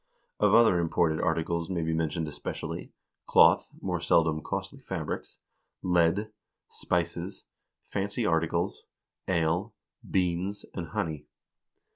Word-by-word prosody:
Of 105 0 +5
other 115 -6 +6
imported 80 -1 +1
articles 85 +1 0
may 85 -3 -1
be 80 0 0
mentioned 80 0 -1
especially: 75 -1 -5 0.4
cloth, - - +6
more - - -1
seldom 80 -2 +3
costly - - -4
fabrics, - - -5 0.5
lead, 90 +4 +2 0.4
spices, 85 +2 -2 0.4
fancy 100 +4 -2
articles, 85 +2 0 0.4
ale, 85 +4 0 0.3
beans, 90 +2 0
and 85 -3 -4
honey." 75 -2 -3
85 Hz, 105 wpm, -29 LUFS, 80-95 Hz, 0.5 s, other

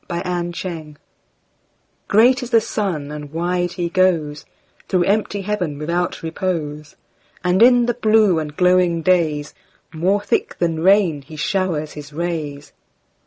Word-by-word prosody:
Summer 175 0 -2
Sun 165 -4 -7 1.1
GREAT 245 +5 +4
is 250 - -6
the 230 -2 +5
sun, 185 -10 -3
and 150 -1 -8
wide 175 +2 -1
he 175 -1 -2
goesThrough 165 -5 +1 0.6
empty 205 0 0
heaven 185 -7 -2
without 170 +4 -2
repose; 160 -3 -4 0.5
And 180 +2 +2
in 245 0 +6
the 240 - 0
blue 215 -6 +3
and 150 -1 -6
glowing 180 -2 +3
daysMore 170 +3 -1
thick - - -1
than 165 -2 -1
rain 185 -5 +3
he 145 +3 -12
showers 155 -1 -1
his 150 -1 -10
rays. 150 -3 -4
175 Hz, 125 wpm, -20 LUFS, 155-190 Hz, 1.1 s, in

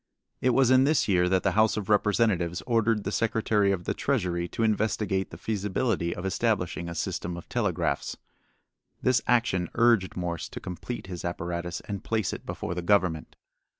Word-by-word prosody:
It 130 - +3
was 130 0 +4
in 130 0 +6
this 155 +1 +2
year 90 -3 +3
that 95 0 +2
the 95 - +2
House 110 +3 +3
of 105 -3 -3
Representatives 105 -4 +2
ordered 115 -3 +2
the 100 - -3
Secretary 110 -2 +1
of 90 -3 -2
the - - -1
Treasury 90 -10 -1
to 115 - -3
investigate 105 -3 0
the 80 - -10
feasibility 105 -2 -1
of 90 - -6
establishing 95 -4 -1
a 85 - -6
system 85 +1 -3
of 85 - -10
telegraphs. - - -1 0.9
This 130 -1 +3
action 115 -8 +2
urged 115 -5 +3
Morse 85 -2 -3
to - - -7
complete 90 +7 -6
his 90 -2 -7
apparatus 85 0 -3
and 100 -3 -6
place 110 -3 -1
it - - -8
before 85 - -4
the 90 - -3
Government. 90 -4 +1
100 Hz, 175 wpm, -27 LUFS, 90-115 Hz, 0.9 s, in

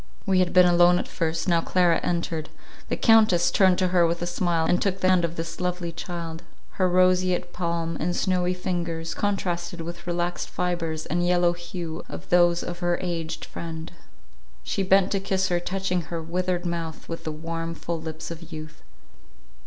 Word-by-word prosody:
We 190 -3 +3
had 180 -1 +2
been 180 -1 +7
alone 175 0 +5
at - - -3
first; 165 0 -2
now 170 -2 +3
Clara 175 -1 +3
entered; 170 -2 -2 0.4
the - - -1
Countess 215 -6 +5
turned 190 -2 +4
to 185 -1 +2
her 180 -1 +4
with 170 +1 -1
a - - 0
smile, 175 -2 0
and 175 +2 +2
took 195 -1 0
the 185 - +2
hand 185 -2 +4
of 170 0 -1
this 165 +1 -5
lovely 180 -1 -2
child; 165 -1 -6 0.4
her 185 - +4
roseate 185 0 +2
palm 170 -1 -2
and 175 +3 -1
snowy 180 -1 +1
fingers, 170 -3 -3
contrasted 175 -4 -2
with 170 +1 -8
relaxed 175 0 -2
fibres 165 -3 -2
and 175 0 0
yellow 175 -1 +3
hue 175 -1 -6
of - - -8
those 175 -1 +4
of 175 0 -5
her 175 -1 +1
aged 165 -3 -3
friend; 165 -1 -7 0.7
she 195 - -2
bent 190 0 +4
to 195 - +1
kiss 190 -1 0
her, 175 -1 +2
touching 185 0 -1
her 170 0 -5
withered 180 +2 -2
mouth 165 -2 -4
with 165 - -6
the 155 - -3
warm, 165 +1 -4
full 165 0 -4
lips 160 +1 -6
of 170 +1 -9
youth. 155 -1 -8
175 Hz, 185 wpm, -25 LUFS, 165-180 Hz, 0.7 s, been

